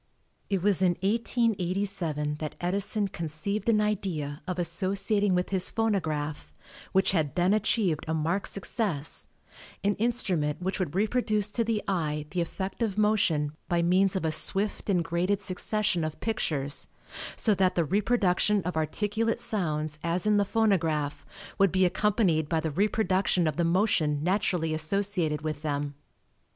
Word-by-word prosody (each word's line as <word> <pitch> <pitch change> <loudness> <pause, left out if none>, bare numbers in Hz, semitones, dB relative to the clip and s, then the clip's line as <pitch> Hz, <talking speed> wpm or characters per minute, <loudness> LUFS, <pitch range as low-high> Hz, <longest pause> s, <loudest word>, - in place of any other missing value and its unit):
It 195 -3 0
was 200 -2 +4
in 180 -2 +4
1887 195 -8 0
that 155 -1 -5
Edison 200 +3 0
conceived 185 +5 -3
an 215 -2 +4
idea 185 -9 -2
of 185 -1 -3
associating 195 +3 +1
with 180 0 0
his 185 -2 +2
phonograph, 160 -9 -1 0.4
which 190 0 +3
had 160 -6 0
then 180 +2 +3
achieved 205 -6 +1
a 160 - -1
marked 165 +6 0
success, 190 - -2 0.6
an 205 +1 +3
instrument 185 -10 0
which 190 +2 -2
would 175 -4 -2
reproduce 215 -1 +1
to 230 - 0
the 225 -2 -1
eye 150 -5 -1
the 180 - 0
effect 190 +5 -4
of 215 -4 -1
motion 180 -9 +2 0.2
by 170 -1 +2
means 185 +3 +3
of 185 - -1
a 160 - +1
swift 195 +7 -1
and 180 -3 +2
graded 175 +4 0
succession 195 -1 0
of 155 -1 -4
pictures, 145 -10 -1 0.5
so 215 - +3
that 190 -2 +2
the 170 - +2
reproduction 205 0 +2
of 180 - -3
articulate 210 +8 0
sounds 155 -6 -2
as 170 +2 -1
in 210 -1 +4
the 205 - +3
phonograph, 165 -10 0 0.3
would 195 -3 +5
be 185 0 +3
accompanied 180 -5 +1
by 165 - +1
the 160 -1 -2
reproduction 195 -1 +1
of 155 -2 0
the 170 - +1
motion 165 -5 +1
naturally 175 -3 0
associated 160 -1 0
with 155 -1 -3
them. 145 -2 -2
185 Hz, 150 wpm, -28 LUFS, 160-205 Hz, 0.6 s, would